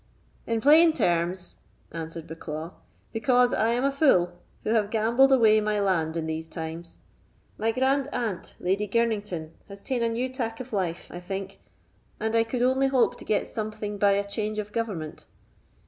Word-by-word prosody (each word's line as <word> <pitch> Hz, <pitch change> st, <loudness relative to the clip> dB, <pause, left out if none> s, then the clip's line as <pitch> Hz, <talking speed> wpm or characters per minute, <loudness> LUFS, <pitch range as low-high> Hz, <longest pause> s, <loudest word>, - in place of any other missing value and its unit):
"In 230 Hz, -1 st, 0 dB
plain 315 Hz, +4 st, +7 dB
terms," 175 Hz, -, -1 dB, 0.3 s
answered 165 Hz, 0 st, -6 dB
Bucklaw, 160 Hz, 0 st, -6 dB, 0.4 s
"because 245 Hz, +2 st, +3 dB
I 220 Hz, -, +2 dB
am 240 Hz, +2 st, +1 dB
a 275 Hz, -, +2 dB
fool, 225 Hz, -, +3 dB, 0.3 s
who 215 Hz, -, -1 dB
have 215 Hz, -3 st, +2 dB
gambled 235 Hz, +5 st, +3 dB
away 220 Hz, -4 st, +5 dB
my 210 Hz, 0 st, 0 dB
land 170 Hz, -5 st, 0 dB
in 165 Hz, -, -2 dB
these 160 Hz, 0 st, -4 dB
times. 165 Hz, +1 st, -7 dB, 0.6 s
My 225 Hz, +1 st, +1 dB
grand 265 Hz, +3 st, +1 dB
aunt, 220 Hz, -7 st, -3 dB
Lady 195 Hz, +3 st, 0 dB
Girnington, 205 Hz, -7 st, -1 dB, 0.2 s
has 200 Hz, 0 st, -11 dB
taen 255 Hz, -3 st, -1 dB
a 230 Hz, -, +2 dB
new 235 Hz, +3 st, -1 dB
tack 235 Hz, -3 st, -4 dB
of 255 Hz, -2 st, -8 dB
life, 180 Hz, -4 st, -2 dB
I 175 Hz, -, -6 dB
think, 195 Hz, +2 st, -6 dB, 0.6 s
and 220 Hz, +1 st, -1 dB
I 230 Hz, -, +5 dB
could 240 Hz, +2 st, -2 dB
only 260 Hz, +2 st, +3 dB
hope 265 Hz, -3 st, +2 dB
to -, -, -11 dB
get 210 Hz, -, +1 dB
something 215 Hz, -1 st, -5 dB
by 200 Hz, 0 st, +4 dB
a 200 Hz, 0 st, 0 dB
change 215 Hz, +1 st, -3 dB
of 210 Hz, -1 st, -4 dB
government. 200 Hz, -10 st, -4 dB
215 Hz, 175 wpm, -26 LUFS, 180-235 Hz, 0.6 s, plain